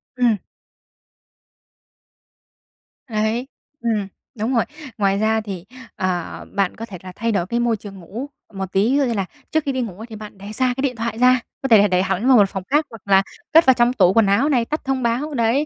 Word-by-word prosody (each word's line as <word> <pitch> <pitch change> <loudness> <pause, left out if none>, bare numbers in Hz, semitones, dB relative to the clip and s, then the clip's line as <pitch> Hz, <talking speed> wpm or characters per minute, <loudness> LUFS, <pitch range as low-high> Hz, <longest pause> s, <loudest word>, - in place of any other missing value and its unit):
Ừm. 240 -4 +3 2.7
Đấy, 220 +3 -1 0.3
ừm, 220 -4 0 0.3
đúng 235 +4 0
rồi. 230 - +3 0.3
Ngoài 195 -1 +2
ra 220 +1 +2
thì, 190 -4 -7 0.3
ờ, 180 -2 -3
bạn 195 -2 +1
có 225 - -6
thể 195 -5 -9
là 185 - -8
thay 230 +1 -1
đổi 185 -4 0
cái 235 +4 -1
môi 235 -2 +1
trường 195 -2 -10
ngủ 230 +11 -7 0.2
một 190 -1 -5
tí, 200 +6 +2
ví 275 - +3
dụ 285 - +3
như 245 -3 0
là 195 -3 -1 0.3
trước 315 -1 +1
khi 280 - 0
đi 260 -1 -1
ngủ 200 -7 -5
ấy 220 +2 -8
thì 225 - -9
bạn 210 -2 -10
để 200 +2 -9
xa 255 +2 +1
cái 265 - -1
điện 265 -3 0
thoại 230 -1 -3
ra, 255 +1 +5 0.2
có 270 - -1
thể 225 - +7
là 205 0 +5
đẩy 180 -1 +2
hẳn 195 +5 -1
vào 260 -2 +7
một 200 -2 +5
phòng 195 - -5
khác 295 +3 +3
hoặc 225 -3 -11
là 195 -1 +5 0.3
cất 325 +1 +7
vào 260 - +7
trong 240 +1 +3
tủ 185 -5 +4
quần 225 0 +5
áo 225 +10 +3
này, 245 -5 +2
tắt 305 +6 -3
thông 265 -1 -1
báo, 250 +6 0
đấy. 240 +3 +2
225 Hz, 230 wpm, -21 LUFS, 200-250 Hz, 2.7 s, thể